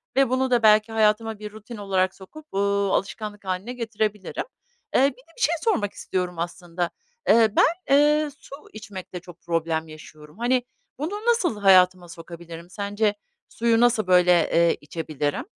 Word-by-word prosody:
ve 270 -2 +3
bunu 260 0 0
da 240 -2 +3
belki 215 +1 +5
hayatıma 220 0 +1
bir 210 0 -7
rutin 215 +2 -10
olarak 190 -2 0
sokup, 295 +11 -13
ııı, 200 0 +1
alışkanlık 205 0 -3
hâline 190 +6 -3
getirebilirim. 220 -4 -3 0.5
Eee, - - +5
bir - - +5
de 265 +5 -21
bir - - -10
şey 335 - +3
sormak 210 - 0
istiyorum 180 -2 -4
aslında. 175 0 -3 0.4
Eee, 225 0 +6
ben, 340 -3 +3
eee, 300 +1 +3
su - - -11 0.2
içmekte 190 -4 -8
çok 175 -1 -14
problem 165 -1 -1
yaşıyorum. 155 0 -14
Hani, 245 +2 +1 0.4
bunu 305 +5 -3 0.2
nasıl 420 - +2
hayatıma 185 -2 +5
sokabilirim? 170 0 -10
Sence 205 +2 -1 0.4
suyu 230 0 +1
nasıl, 235 -4 +3
böyle, 180 -1 +5 0.2
eee, 170 0 +3
içebilirim? 150 -2 -3
205 Hz, 155 wpm, -24 LUFS, 180-230 Hz, 0.5 s, Eee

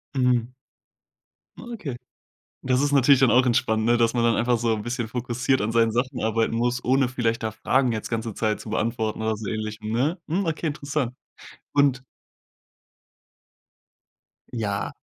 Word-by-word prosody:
Mhm. 125 -2 +2 1.1
Ah, - - -10
okay. 150 - -5 0.7
Das 130 +1 +2
ist 145 0 +1
natürlich 140 -1 +5
dann 130 -3 +5
auch 125 +1 +5
entspannt, 110 -2 +1
ne, 120 +1 +4
dass 115 0 +2
man 120 -1 +1
dann 115 0 +3
einfach 120 0 +2
so 115 -1 +1
'n 105 - -3
bisschen 120 0 -3
fokussiert 125 +2 -1
an 110 +2 -1
seinen 115 -1 +3
Sachen 125 +3 -2
arbeiten 115 +1 +1
muss, 120 +1 0
ohne 130 +1 +3
vielleicht 115 -3 -1
da 110 - -1
Fragen 125 +3 +1
jetzt 110 -1 -4
ganze 115 -2 -3
Zeit 110 -1 -1
zu 110 - -9
beantworten 110 -1 -1
oder 110 0 0
so 105 -1 -7
ähnlich, 110 0 -4
hm, 110 0 -4
ne? 140 +10 0
Mhm, 180 +4 -1
okay, 160 +1 -2
interessant. 140 -3 -2 0.6
Und 140 -3 +3 2.5
Ja. 105 -4 -3
120 Hz, 165 wpm, -24 LUFS, 110-130 Hz, 2.5 s, natürlich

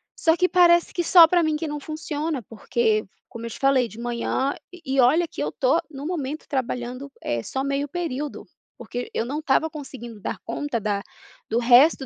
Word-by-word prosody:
só 325 +1 +2
que 365 - +3
parece 345 -1 +4
que 345 - -1
só 345 -1 +9
pra 350 +1 +3
mim 315 -1 +1
que 315 +1 -3
não 295 0 -4
funciona, 305 -2 -4
porque, 225 0 0 0.2
como 230 0 -7
eu - - -5
te - - -8
falei, 270 -3 +3
de 220 +1 -12
manhã 240 +3 -1 0.2
e 360 - -12
e 265 0 0
olha 315 +8 +4
que 145 - -7
eu 150 - 0
estou 260 - +1
no 280 -1 -8
momento 310 -3 -4
trabalhando, 255 0 -3
eh, 120 -1 -1
só 265 - -3
meio 280 +1 -1
período, 300 -3 -4 0.3
porque 245 0 -6
eu - - -1
não 285 +5 -3
estava 310 +1 +2
conseguindo 250 -7 -9
dar - - -3
conta 290 -6 -2
da 205 -1 -1 0.5
do 225 - 0
resto 255 +4 +5
275 Hz, 200 wpm, -24 LUFS, 240-315 Hz, 0.5 s, só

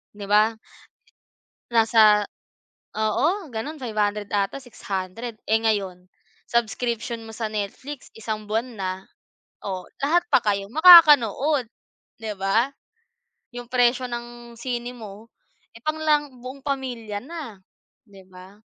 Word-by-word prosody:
'Di 205 - -7
ba? 215 +2 +4 1.2
Nasa 220 -2 +5 0.7
oo, 300 - 0
gano'n, 265 +7 -5
500 210 -3 -1
ata 200 +5 0
600. 220 -1 -6
Eh 220 - +5
ngayon, 195 -5 -1 0.4
subscription 235 -1 -2
mo 225 - -10
sa 220 0 -3
Netflix 215 +7 -6
isang 215 -1 -5
buwan 225 +2 -2
na. 190 -1 -2 0.7
O, 185 -2 -5
lahat 320 +5 +3
pa - - +5
kayo 200 -1 0
makakanood, 295 - +7 0.6
'di 220 -1 -4
ba? 195 +7 +1 0.9
'Yung 245 0 -7
presyo 250 0 +2
ng 240 0 -8
sine 245 0 -4
mo, 215 -2 -11 0.5
eh, - - -13
pang 310 0 -1
lang 295 -4 +1
buong 260 +2 -9
pamilya 245 -7 -4
na, 285 - -8 0.5
'di 195 -3 -16
ba? 185 +3 -15
230 Hz, 120 wpm, -24 LUFS, 210-255 Hz, 1.2 s, makakanood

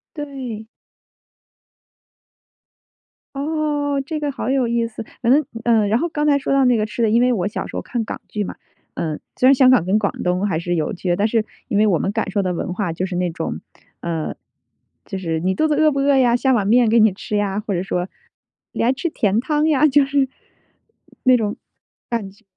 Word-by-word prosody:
对。 265 -7 -6 2.7
哦， 290 -1 -1
这 310 +1 -3
个 295 -1 -2
好 270 - -4
有 265 -2 +2
意 235 0 0
思。 225 0 -8 0.2
反 240 0 +2
正 295 +2 +4 0.2
嗯， 225 -3 +3
然 220 +3 +2
后 340 - -1
刚 300 -1 -1
才 285 -1 +4
说 275 - -3
到 275 -1 +4
那 250 -1 +4
个 215 - 0
吃 215 +2 -5
的， 225 - +3
因 230 +3 +3
为 250 0 +3
我 190 -4 0
小 205 - -4
时 - - -9
候 - - -2
看 240 -2 -3
港 - - -6
剧 210 - -3
嘛， - - -6 0.4
呃 155 -2 -3 0.2
虽 255 - +4
然 270 - +8
香 260 -1 +5
港 255 -10 +4
跟 190 +3 +2
广 200 -2 0
东 180 +2 0
还 165 -5 -1
是 175 +1 -2
有 160 +4 -1
区 185 -1 -7
别， 175 - +3
但 200 +4 +1
是 225 -1 +1 0.2
因 210 - 0
为 215 +1 +4
我 185 -5 +3
们 195 - -1
感 205 - -2
受 200 +1 0
的 185 -1 -1
文 175 +1 -3
化 185 -2 -2
就 175 +3 -2
是 185 -1 -5
那 180 0 0
种， 165 -1 -4 0.4
呃， 165 -2 -3 0.7
就 195 - -5
是： 165 -4 -2
“你 185 +3 0
肚 315 - +2
子 305 - +1
饿 310 +1 +4
不 275 - -2
饿 280 0 +3
呀？ 245 -2 +4
下 260 +2 +2
碗 205 -5 +1
面 235 +1 +4
给 230 +1 +4
你 220 -3 +5
吃 210 +2 -4
呀！”。 205 -1 -1
或 205 - -2
者 180 0 -1
说： 180 -1 -2 0.6
“你 - - -1
还 240 - +4
吃 275 +6 -2
甜 210 -7 +1
汤 300 +4 +1
呀”， 305 0 +4
就 285 0 +4
是 275 -1 +1 1.0
那 255 -1 +6
种 210 -3 -2 0.5
感 230 -5 -2
觉。 200 +3 -24
230 Hz, 240 characters per minute, -20 LUFS, 195-275 Hz, 2.7 s, 然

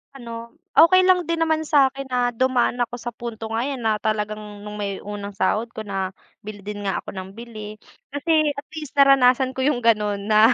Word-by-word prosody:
Ano, 240 -3 -10 0.5
okey 370 +3 +8
lang 360 -2 +4
din 335 +1 -1
naman 315 -1 +1
sa'kin 275 -2 +2
na 250 -2 +1
dumaan 245 0 +1
ako 240 0 -1
sa 240 - -3
punto 230 -1 -7
nga 225 +3 -1
'yon 275 -3 -4
na 220 -1 +1
talagang 210 -1 -3
nung 210 0 -7
may 200 -2 -4
unang 205 0 -6
sahod 200 +4 +1
ko 220 - -5
na 195 -2 -3 0.3
bili 210 -1 -8
din 205 0 -6
nga 195 - -1
ako 190 - -9
ng 190 0 -6
bili. 215 -2 -9 0.3
Kasi 310 0 +2
at 280 +1 -8
least 300 -3 -7
naranasan 265 -2 +4
ko 260 - 0
yung 255 -5 +1
gano'n 210 -3 +2
na. 215 +3 +6
235 Hz, 200 wpm, -23 LUFS, 210-275 Hz, 0.5 s, okey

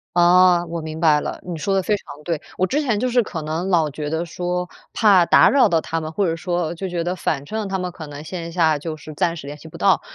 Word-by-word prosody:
哦， 175 0 +5
我 170 0 -4
明 155 0 -6
白 150 -3 +4
了， - - -5
你 175 - -4
说 195 +4 -1
得 190 - +1
非 210 - +1
常 - - -8 0.2
对。 165 -2 -2 0.2
我 185 - +2
之 285 +11 0
前 235 -8 0
就 255 +1 0
是 245 0 +3
可 170 -7 -5
能 160 +5 -3
老 165 -5 +3
觉 150 +1 -5
得 160 +2 -2
说， 180 +1 -3 0.2
怕 200 -6 +5
打 - - +6
扰 275 -1 +5
到 165 - +3
他 165 +1 -3
们， 155 0 -5
或 200 +4 0
者 165 -2 0
说 175 -1 -2
就 190 +3 -5
觉 175 -1 -2
得 175 +2 -2
反 145 -5 -2
正 215 +4 -3
他 190 0 -2
们 180 -1 -3
可 160 -3 -9
能 145 +1 -9
线 170 0 -6
下 160 -3 +2
就 155 +1 -5
是 155 +1 -10
暂 170 +3 0
时 140 - -9
联 145 - -6
系 155 - -13
不 160 - -11
到， 195 -3 +3
175 Hz, 295 characters per minute, -21 LUFS, 160-185 Hz, 0.2 s, 打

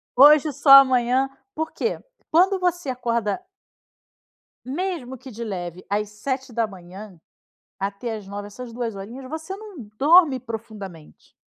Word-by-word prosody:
Hoje, 295 +3 +7
só 285 +2 -1
amanhã." 260 -1 +6 0.3
Por 320 +1 -3
quê? 460 - -2 0.3
Quando 375 +4 +4
você 355 -5 -1
acorda 235 - -1 1.2
mesmo 275 -3 -4
que 260 +2 -11
de 235 0 -8
leve, 180 -4 -6
às 210 +1 0
7h, 210 - -5 0.6
até 200 +4 -3
às 210 -2 -10
9h, 205 +1 -7
essas 240 +3 -9
2 230 -3 -4
horinhas, 245 +7 -9
você 320 +5 -5
não 415 -7 -11 0.2
dorme 300 -2 +5
profundamente. 215 -8 -9
245 Hz, 125 wpm, -23 LUFS, 210-290 Hz, 1.2 s, Hoje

